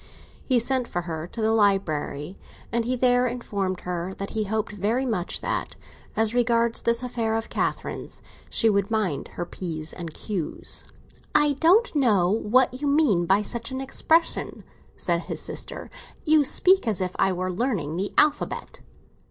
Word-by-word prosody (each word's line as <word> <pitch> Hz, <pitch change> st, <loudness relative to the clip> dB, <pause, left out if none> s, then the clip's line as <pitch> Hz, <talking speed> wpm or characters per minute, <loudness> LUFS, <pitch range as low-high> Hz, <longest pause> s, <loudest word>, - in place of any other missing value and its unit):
He 255 Hz, -, +2 dB
sent 250 Hz, +1 st, +2 dB
for 175 Hz, -, -3 dB
her 165 Hz, -1 st, -5 dB
to 220 Hz, +4 st, -5 dB
the 220 Hz, -, +3 dB
library, 190 Hz, -6 st, +1 dB, 0.4 s
and 235 Hz, 0 st, 0 dB
he 255 Hz, +2 st, 0 dB
there 250 Hz, 0 st, +3 dB
informed 200 Hz, -6 st, -3 dB
her 180 Hz, +1 st, -4 dB
that 195 Hz, -, -6 dB
he 215 Hz, -1 st, -1 dB
hoped 215 Hz, +1 st, -2 dB
very 210 Hz, +6 st, 0 dB
much 200 Hz, -8 st, -2 dB
that, -, -, -3 dB, 0.4 s
as 220 Hz, 0 st, +1 dB
regarded 235 Hz, -1 st, +2 dB
this 235 Hz, +1 st, +2 dB
affair 230 Hz, -3 st, -1 dB
of 225 Hz, 0 st, -3 dB
Catherine's, -, -, -3 dB, 0.3 s
she 225 Hz, -, +3 dB
would 200 Hz, -2 st, +2 dB
mind 210 Hz, -10 st, -1 dB
her 175 Hz, -, -4 dB
p's 160 Hz, -3 st, -4 dB
and 170 Hz, -3 st, -6 dB
q's. 180 Hz, 0 st, -3 dB, 0.5 s
"I 295 Hz, -1 st, +5 dB
don't 355 Hz, -, +4 dB
know 205 Hz, -10 st, +3 dB
what 250 Hz, +4 st, +2 dB
you 290 Hz, -, 0 dB
mean 275 Hz, -, +3 dB
by 195 Hz, +3 st, +3 dB
such 235 Hz, +3 st, -3 dB
an 260 Hz, 0 st, -4 dB
expression," 320 Hz, +5 st, +1 dB, 0.3 s
said -, -, 0 dB
his -, -, -5 dB
sister. -, -, -5 dB, 0.3 s
"You 310 Hz, -1 st, +5 dB
speak 370 Hz, +2 st, +4 dB
as 210 Hz, -5 st, +1 dB
if 185 Hz, -1 st, -2 dB
I 195 Hz, -, +3 dB
were 185 Hz, 0 st, -2 dB
learning 180 Hz, -, -1 dB
the 195 Hz, +2 st, -2 dB
alphabet." 295 Hz, 0 st, +1 dB
220 Hz, 165 wpm, -25 LUFS, 185-250 Hz, 0.5 s, I